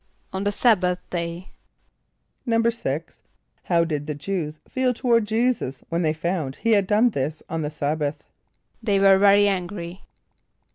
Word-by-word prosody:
=On 190 Hz, +1 st, -2 dB
the 205 Hz, -, +1 dB
sabbath 195 Hz, -5 st, +3 dB
day.= 170 Hz, +1 st, -4 dB, 1.0 s
=6.= 230 Hz, -, -1 dB, 0.5 s
How 170 Hz, -2 st, +3 dB
did 150 Hz, -3 st, -3 dB
the 150 Hz, -, -3 dB
Jew[s+] 155 Hz, -1 st, -4 dB
feel 255 Hz, -1 st, 0 dB
toward 235 Hz, -3 st, +2 dB
J[=e]´[s+]us 220 Hz, -, -1 dB
when 170 Hz, +1 st, 0 dB
they 155 Hz, -3 st, +2 dB
found 160 Hz, -3 st, -2 dB
that -, -, -23 dB
he 230 Hz, -, +2 dB
had 200 Hz, -3 st, +3 dB
done 220 Hz, +4 st, +4 dB
this 150 Hz, -1 st, -3 dB
on 165 Hz, -1 st, -3 dB
the 150 Hz, -, -2 dB
sabbath? 150 Hz, 0 st, -2 dB, 0.6 s
=They 200 Hz, -3 st, +1 dB
were 195 Hz, -1 st, +6 dB
very 205 Hz, 0 st, +6 dB
angry. 185 Hz, -1 st, -3 dB
185 Hz, 150 wpm, -23 LUFS, 155-210 Hz, 1.0 s, were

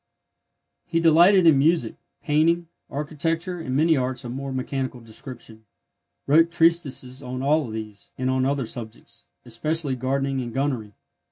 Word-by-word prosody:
He 165 Hz, -, 0 dB
delighted 170 Hz, +3 st, +6 dB
in 155 Hz, -5 st, +6 dB
music, 150 Hz, -6 st, +2 dB, 0.3 s
painting, 165 Hz, +3 st, +2 dB, 0.2 s
architecture, 165 Hz, +5 st, -2 dB
and 130 Hz, -6 st, -3 dB
many 160 Hz, +3 st, +4 dB
arts 130 Hz, -1 st, -2 dB
of 120 Hz, -, -5 dB
a -, -, -5 dB
more 135 Hz, +1 st, -5 dB
mechanical 130 Hz, -1 st, -3 dB
description; 115 Hz, -1 st, -9 dB, 0.6 s
wrote 165 Hz, +4 st, +5 dB
treatises 160 Hz, -6 st, +1 dB
on 130 Hz, 0 st, -5 dB
all 145 Hz, -2 st, +2 dB
these, 110 Hz, -2 st, -8 dB
and 130 Hz, -, -2 dB
on 130 Hz, 0 st, +1 dB
other 135 Hz, -1 st, 0 dB
subjects, 115 Hz, -1 st, -9 dB, 0.2 s
especially 140 Hz, +4 st, -1 dB
gardening 135 Hz, +1 st, -1 dB
and 120 Hz, -1 st, -6 dB
gunnery. 130 Hz, -7 st, -2 dB
135 Hz, 145 wpm, -24 LUFS, 125-160 Hz, 0.6 s, delighted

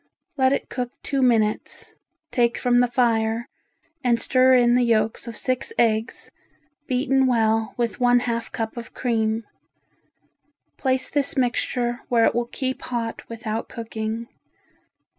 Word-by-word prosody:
Let 260 Hz, -2 st, +3 dB
it 275 Hz, -, -1 dB
cook 250 Hz, -2 st, -3 dB
two 275 Hz, -1 st, -1 dB
minutes, 225 Hz, -4 st, +1 dB, 0.4 s
take 235 Hz, -1 st, +2 dB
from 245 Hz, -1 st, +3 dB
the 245 Hz, -, +4 dB
fire 230 Hz, -1 st, +1 dB, 0.6 s
and 240 Hz, -2 st, +3 dB
stir 255 Hz, +1 st, +4 dB
in 240 Hz, -1 st, +4 dB
the 250 Hz, -, +4 dB
yolks 225 Hz, -1 st, +1 dB
of 230 Hz, -, -6 dB
six 255 Hz, -, -1 dB
eggs 220 Hz, +1 st, 0 dB, 0.6 s
beaten 265 Hz, +1 st, +2 dB
well 225 Hz, -2 st, +1 dB
with 240 Hz, +1 st, -1 dB
one 245 Hz, 0 st, +4 dB
half 235 Hz, -1 st, -3 dB
cup 225 Hz, +1 st, -4 dB
of 235 Hz, -1 st, -8 dB
cream. 225 Hz, -2 st, 0 dB, 1.3 s
Place 260 Hz, -1 st, 0 dB
this 285 Hz, -1 st, 0 dB
mixture 245 Hz, -1 st, 0 dB
where 230 Hz, -2 st, +4 dB
it -, -, +3 dB
will 240 Hz, 0 st, -1 dB
keep 260 Hz, -1 st, -3 dB
hot 235 Hz, -2 st, -3 dB
without 225 Hz, -1 st, -4 dB
cooking. 225 Hz, 0 st, -5 dB
240 Hz, 140 wpm, -23 LUFS, 225-255 Hz, 1.3 s, the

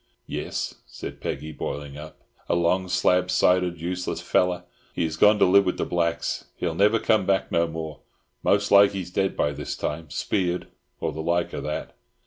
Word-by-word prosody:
"Yis," -, -, -4 dB
said -, -, -8 dB
Peggy, 80 Hz, -, -4 dB
boiling 75 Hz, -2 st, -5 dB
up. 75 Hz, +1 st, -10 dB, 0.3 s
"A -, -, +3 dB
long 90 Hz, +2 st, +2 dB
slab 90 Hz, 0 st, +2 dB
sided 90 Hz, -1 st, +2 dB
useless 90 Hz, +2 st, -3 dB
feller. 90 Hz, -1 st, +1 dB, 0.3 s
He's 80 Hz, -2 st, -1 dB
gone 105 Hz, +5 st, +5 dB
to -, -, +5 dB
live 100 Hz, +2 st, +6 dB
wid 90 Hz, -, 0 dB
the -, -, -1 dB
blacks. 85 Hz, -1 st, -1 dB
He'll 85 Hz, -2 st, -2 dB
never 105 Hz, +6 st, +4 dB
come 110 Hz, -3 st, +2 dB
back 95 Hz, -1 st, +1 dB
no 85 Hz, 0 st, +2 dB
more. 80 Hz, -2 st, -6 dB, 0.4 s
Most -, -, +2 dB
like 100 Hz, 0 st, +7 dB
he's 90 Hz, -3 st, -5 dB
dead 95 Hz, +1 st, 0 dB
by 75 Hz, -, +2 dB
this -, -, -5 dB
time, 80 Hz, +1 st, -4 dB
speared 90 Hz, 0 st, -1 dB, 0.3 s
or -, -, -1 dB
the 80 Hz, -, -5 dB
like 85 Hz, +1 st, 0 dB
of -, -, -3 dB
that!" 75 Hz, -, -4 dB
90 Hz, 180 wpm, -25 LUFS, 80-95 Hz, 0.4 s, like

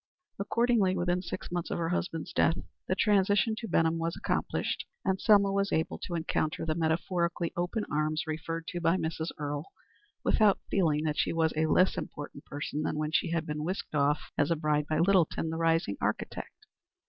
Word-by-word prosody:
Accordingly, 220 Hz, -2 st, +2 dB
within 175 Hz, +1 st, +1 dB
six 180 Hz, -, -6 dB
months 175 Hz, -1 st, -2 dB
of -, -, -2 dB
her 165 Hz, -1 st, -1 dB
husband's 170 Hz, -2 st, -2 dB
death, 165 Hz, -, +3 dB, 0.3 s
the 185 Hz, -, +1 dB
transition 205 Hz, +2 st, +3 dB
to 230 Hz, -, -5 dB
Benham 165 Hz, -2 st, +2 dB
was 165 Hz, 0 st, -1 dB
accomplished, -, -, -1 dB, 0.2 s
and 190 Hz, -1 st, +1 dB
Selma 200 Hz, -2 st, +5 dB
was 200 Hz, 0 st, 0 dB
able 160 Hz, -, 0 dB
to 175 Hz, -, -4 dB
encounter 160 Hz, -1 st, -1 dB
the 160 Hz, -, +1 dB
metaphorically 170 Hz, +1 st, 0 dB
open 175 Hz, +5 st, -1 dB
arms, 155 Hz, +1 st, 0 dB
referred 165 Hz, +1 st, -4 dB
to 175 Hz, -, -4 dB
by 170 Hz, +2 st, +3 dB
Mrs. 160 Hz, -1 st, -2 dB
Earle, 145 Hz, 0 st, -4 dB, 0.5 s
without 210 Hz, -3 st, +4 dB
feeling 155 Hz, -6 st, +2 dB
that 155 Hz, -1 st, -1 dB
she -, -, +2 dB
was 160 Hz, -1 st, +1 dB
a 155 Hz, +1 st, +2 dB
less 185 Hz, +4 st, +3 dB
important 145 Hz, -1 st, -8 dB
person 145 Hz, +1 st, -4 dB
than 155 Hz, -, -1 dB
when 155 Hz, 0 st, -1 dB
she -, -, +1 dB
had 165 Hz, -1 st, -1 dB
been 150 Hz, -1 st, -3 dB
whisked 185 Hz, +1 st, -4 dB
off 145 Hz, 0 st, +1 dB
as 145 Hz, -, +3 dB
a 170 Hz, -, +3 dB
bride 150 Hz, -1 st, 0 dB
by 155 Hz, -, +1 dB
Littleton, 170 Hz, -2 st, +2 dB
the 160 Hz, -, -3 dB
rising 165 Hz, -10 st, +1 dB
architect. -, -, -3 dB
165 Hz, 185 wpm, -30 LUFS, 155-185 Hz, 0.5 s, Selma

